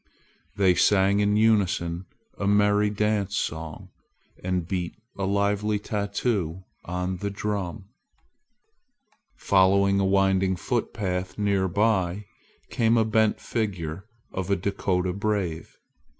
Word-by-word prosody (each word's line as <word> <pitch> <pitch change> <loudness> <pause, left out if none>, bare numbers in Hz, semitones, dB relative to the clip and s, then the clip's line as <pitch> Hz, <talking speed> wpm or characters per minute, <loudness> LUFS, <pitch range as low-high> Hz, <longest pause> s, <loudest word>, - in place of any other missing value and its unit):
They 95 -2 +4
sang 100 +2 +3
in 105 0 +2
unison 95 -5 +1 0.3
a 100 - -1
merry 105 0 +3
dance 105 -1 0
song, 80 0 -4 0.5
and 90 -2 -1
beat 90 -2 -3 0.2
a 100 - -2
lively 100 +2 +1
tattoo 100 -3 -2 0.2
on 90 +1 -3
the 100 +3 -3
drum. 100 -1 -4 1.5
Following 100 +1 +3
a 100 - +2
winding 95 -1 +2
footpath 95 -4 -2
near 100 -2 +1
by, 100 -1 +1 0.5
came 115 -2 +2
a 110 - +3
bent 110 -1 +2
figure 95 -5 -3 0.2
of 95 -1 -4
a 100 - +3
Dakota 90 -1 -1
brave. 100 -5 -2
100 Hz, 110 wpm, -25 LUFS, 90-105 Hz, 1.5 s, They